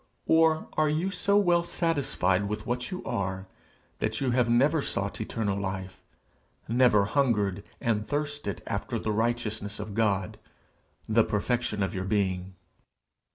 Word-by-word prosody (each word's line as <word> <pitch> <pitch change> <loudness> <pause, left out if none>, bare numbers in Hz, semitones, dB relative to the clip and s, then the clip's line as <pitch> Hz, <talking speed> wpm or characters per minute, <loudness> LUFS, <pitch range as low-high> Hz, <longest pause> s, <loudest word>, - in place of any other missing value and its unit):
or 160 -1 +4
are 155 -1 +2
you 165 +6 0
so 200 +2 +2
well 175 -4 +4
satisfied 145 - 0
with 105 0 -4
what 125 +1 -2
you 185 -1 -5
are, 95 -5 -2 0.5
that 110 +1 -1
you 130 -2 0
have 120 -1 +2
never 140 +6 +4
sought 100 -4 -2
eternal 105 -2 -1
life, 95 -1 -4 0.7
never 115 -4 +4
hungered 105 -7 +1 0.2
and 110 -2 0
thirsted 145 -8 -3
after - - -2
the 110 - -2
righteousness 110 -2 -1
of 105 0 -5
God, 100 -4 0 0.7
the 110 +1 +4
perfection 105 -1 -1
of 95 - -2
your 95 0 -3
being? 95 -2 -1
110 Hz, 140 wpm, -28 LUFS, 100-140 Hz, 0.7 s, or